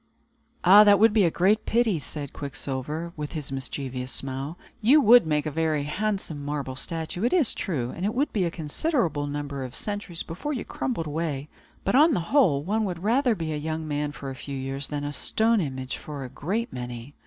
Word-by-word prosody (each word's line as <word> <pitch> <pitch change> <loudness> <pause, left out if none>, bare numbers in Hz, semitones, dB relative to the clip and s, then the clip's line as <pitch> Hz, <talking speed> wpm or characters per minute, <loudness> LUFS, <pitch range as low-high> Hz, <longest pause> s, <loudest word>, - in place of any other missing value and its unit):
"And 205 +4 +9
that 200 -1 +8
would 220 +1 +5
be 210 -4 +5
a - - +4
great 200 +6 +2
pity," 225 -7 +2
said 145 -1 -6
Quicksilver, 145 +4 -4
with 150 0 -5
his 150 -4 -5
mischievous 130 -1 -4
smile. 135 +4 -4 0.2
"You 260 +8 +6
would 240 - +7
make 150 -1 +1
a 155 - -2
very 155 -1 0
handsome 185 -2 -2
marble 140 -2 -3
statue, 165 +6 -4
it 240 - +2
is 325 - +3
true, 130 -9 -2
and 175 - -6
it 210 +4 0
would 285 +4 0
be 200 - +1
a 170 - +1
considerable 165 - -1
number 145 -1 -4
of 130 0 -7
centuries 205 -5 -4
before 245 - -4
you 250 - -4
crumbled 230 -11 -3
away; 150 -2 -3 0.3
but, - - 0
on 300 +4 +6
the - - +1
whole, 180 - +4
one 215 +6 0
would 180 -2 -4
rather 240 +2 +3
be 160 -4 -3
a - - -2
young 155 +1 -3
man 145 0 -1
for 140 -2 -7
a - - -7
few 140 0 -6
years, 135 +1 -3
than 145 -1 -3
a 145 0 -3
stone 225 +7 +2
image 130 -4 -4
for 145 -2 -7
a 130 - -6
great 220 - -3
many." 125 +2 -6
160 Hz, 210 wpm, -26 LUFS, 140-210 Hz, 0.3 s, And